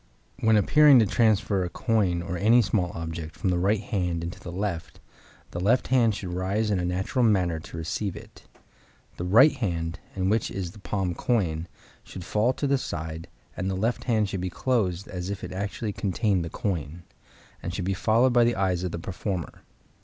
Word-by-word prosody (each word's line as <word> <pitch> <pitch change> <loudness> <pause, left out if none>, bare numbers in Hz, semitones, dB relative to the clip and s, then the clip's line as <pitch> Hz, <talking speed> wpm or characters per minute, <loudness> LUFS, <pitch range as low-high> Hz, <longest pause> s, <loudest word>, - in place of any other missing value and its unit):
When 110 -1 +4
appearing 145 +6 +6
to 115 - +5
transfer 105 -3 +2
a 90 - -3
coin, 95 -5 0
or 90 - -4
any 115 +6 +5
small 90 -2 0
object, 80 -1 -5
from 90 +3 -1
the 90 - +1
right 100 +3 +2
hand 90 -6 -2
into 85 +1 -6
the 85 - -8
left, 90 -2 -4 0.5
the 85 - -4
left 110 +8 +2
hand 120 -4 +3
should 90 -4 -5
rise 100 +4 0
in 100 - +1
a 90 - -1
natural 95 +8 0
manner 90 -7 +2
to 80 - -10
receive 85 +4 -3
it. - - -13 0.7
The - - -4
right 120 +11 +7
hand, 85 -6 -3 0.2
in 95 -1 0
which 110 +2 +1
is 90 -3 -4
the 105 - -14
palmed 95 -3 -2
coin, 85 -9 0 0.4
should 90 -2 -9
fall 110 +6 +2
to 145 - -3
the 140 -1 +2
side; 80 -5 -5 0.3
and 95 +1 -2
the 95 - -1
left 110 +6 -1
hand 110 -4 +2
should 95 -2 -4
be 90 - -2
closed 100 -4 -1
as 90 0 -5
if 100 -1 -5
it - - -5
actually 100 +2 -3
contained 100 -2 0
the 85 - -5
coin, 85 -3 -3 0.6
and 85 - -4
should 90 0 -3
be 95 - 0
followed 115 +6 +3
by 120 0 +5
the 120 0 +2
eyes 95 -2 0
of 90 - -2
the - - -4
performer. 90 0 -5
95 Hz, 200 wpm, -26 LUFS, 85-110 Hz, 0.7 s, right